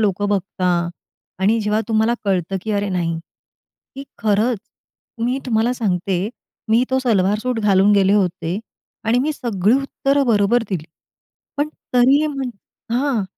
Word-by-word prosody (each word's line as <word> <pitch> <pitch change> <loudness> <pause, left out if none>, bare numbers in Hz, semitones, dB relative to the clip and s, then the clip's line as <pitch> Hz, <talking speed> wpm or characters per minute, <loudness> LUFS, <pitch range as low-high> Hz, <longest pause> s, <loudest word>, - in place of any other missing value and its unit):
लोकं 205 -1 +1
बघता 195 -2 -2 0.7
आणि 205 +4 +3
जेव्हा 210 +1 +1
तुम्हाला 220 +1 +2
कळतं, 190 -1 0
की 220 - -4
अरे 205 0 0
नाही 170 -3 -1 0.8
की 275 +1 -7
खरंच 215 +2 +1 0.7
मी 250 +3 0
तुम्हाला 230 0 +2
सांगते, 190 -4 -1 0.4
मी 230 +3 +4
तो 260 - +2
सलवार 210 -5 +2
सूट 250 +1 -2
घालून 200 -1 +4
गेले 195 -1 +4
होते 180 -2 0 0.5
आणि 225 +2 +2
मी 295 +5 +1
सगळी 220 -6 +1
उत्तरं 275 0 0
बरोबर 225 +1 +3
दिली. 180 -6 -3 0.7
पण 290 +1 0 0.3
तरीही 270 +5 +5
म्हण 275 -4 -3 0.4
हां. 255 -5 +1
215 Hz, 140 wpm, -20 LUFS, 195-245 Hz, 0.8 s, तरीही